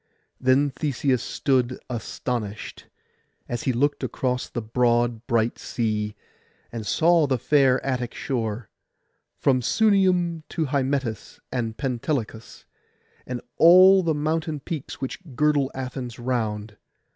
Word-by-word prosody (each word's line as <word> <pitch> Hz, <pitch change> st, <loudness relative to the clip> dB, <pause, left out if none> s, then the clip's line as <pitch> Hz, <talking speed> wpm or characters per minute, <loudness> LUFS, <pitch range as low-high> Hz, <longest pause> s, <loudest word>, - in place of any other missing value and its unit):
Then 130 Hz, +2 st, +3 dB
Theseus 135 Hz, -3 st, 0 dB
stood 130 Hz, -2 st, 0 dB
astonished, 115 Hz, -3 st, -5 dB, 0.6 s
as 120 Hz, -1 st, -4 dB
he 130 Hz, -, +2 dB
looked 145 Hz, +4 st, 0 dB
across 125 Hz, -1 st, -2 dB
the -, -, -4 dB
broad 120 Hz, 0 st, +1 dB
bright 115 Hz, 0 st, +1 dB
sea, 105 Hz, -2 st, -2 dB, 0.6 s
and 115 Hz, -3 st, -6 dB
saw 165 Hz, -, +4 dB
the 130 Hz, -1 st, +1 dB
fair 135 Hz, 0 st, +3 dB
Attic 125 Hz, -3 st, -2 dB
shore, 115 Hz, -4 st, -3 dB, 0.7 s
from 130 Hz, -2 st, +2 dB
Sunium 185 Hz, -, +2 dB
to 160 Hz, -, -1 dB
Hymettus 135 Hz, -4 st, -2 dB
and 115 Hz, -3 st, -3 dB
Pentelicus, 125 Hz, -4 st, -3 dB, 0.6 s
and 125 Hz, -1 st, -4 dB, 0.2 s
all 185 Hz, +3 st, +8 dB
the 165 Hz, -3 st, 0 dB
mountain 155 Hz, +1 st, -1 dB
peaks 150 Hz, -2 st, -6 dB
which 130 Hz, -, -4 dB, 0.2 s
girdle 145 Hz, -1 st, +2 dB
Athens 130 Hz, -2 st, -5 dB
round. 110 Hz, -4 st, -3 dB
130 Hz, 115 wpm, -24 LUFS, 120-145 Hz, 0.7 s, all